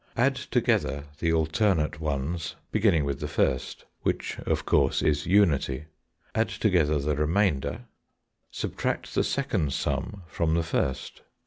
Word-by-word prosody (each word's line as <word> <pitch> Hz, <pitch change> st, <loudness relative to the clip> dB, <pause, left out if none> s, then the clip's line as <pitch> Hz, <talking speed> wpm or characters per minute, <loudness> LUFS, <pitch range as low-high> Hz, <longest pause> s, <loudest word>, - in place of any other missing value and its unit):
Add -, -, +4 dB
together 70 Hz, +1 st, 0 dB, 0.2 s
the 85 Hz, -, +1 dB
alternate 80 Hz, -1 st, +1 dB
ones 80 Hz, +2 st, -2 dB, 0.2 s
beginning 100 Hz, -9 st, +3 dB
with 70 Hz, -1 st, -2 dB
the 75 Hz, -, -3 dB
first, 65 Hz, -3 st, -1 dB, 0.2 s
which, -, -, -2 dB
of -, -, 0 dB
course, -, -, +2 dB
is 75 Hz, -1 st, +1 dB
unity. 75 Hz, -8 st, +3 dB, 0.5 s
Add 110 Hz, +1 st, +1 dB
together 85 Hz, -8 st, +2 dB
the 75 Hz, +1 st, 0 dB
remainder. 80 Hz, -, 0 dB, 0.6 s
Subtract -, -, -3 dB
the -, -, +2 dB
second 105 Hz, -, 0 dB
sum 100 Hz, -3 st, -2 dB
from 80 Hz, 0 st, 0 dB
the 85 Hz, -, +1 dB
first. 70 Hz, -4 st, -2 dB
80 Hz, 130 wpm, -27 LUFS, 70-95 Hz, 0.6 s, Add